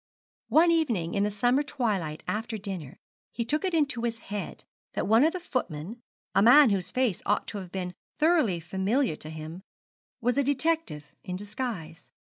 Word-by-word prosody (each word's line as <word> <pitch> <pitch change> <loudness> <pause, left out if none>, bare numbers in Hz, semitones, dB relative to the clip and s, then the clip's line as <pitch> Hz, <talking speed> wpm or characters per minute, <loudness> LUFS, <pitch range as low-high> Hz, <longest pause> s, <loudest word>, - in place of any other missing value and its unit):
One 335 +2 +5
evening, 235 - +1
in 200 - +1
the 205 - +2
summer 245 +7 +2
twilight 205 - -2
after 220 +1 -2
dinner, 190 -9 -6 0.4
he 235 - -2
took 300 - 0
it 370 -3 0
into 285 -6 +1
his 230 -1 -1 0.2
head 205 -3 -5 0.3
that - - -1
one 220 +6 +5
of 320 - +4
the 365 - -4
footmen 230 - -4 0.3
a - - +4
man 250 +3 +8
whose 190 -3 0
face 250 -8 0
ought 205 - 0
to 205 - -5
have 185 -2 -9
been 180 -2 -4 0.2
thoroughly 305 - +3
familiar 190 - 0
to 155 - -8
him 160 +3 -7 0.6
was 245 +3 +1
a - - +3
detective 285 - -1
in 180 - -4
disguise. 205 -5 -5
220 Hz, 175 wpm, -28 LUFS, 180-270 Hz, 0.6 s, man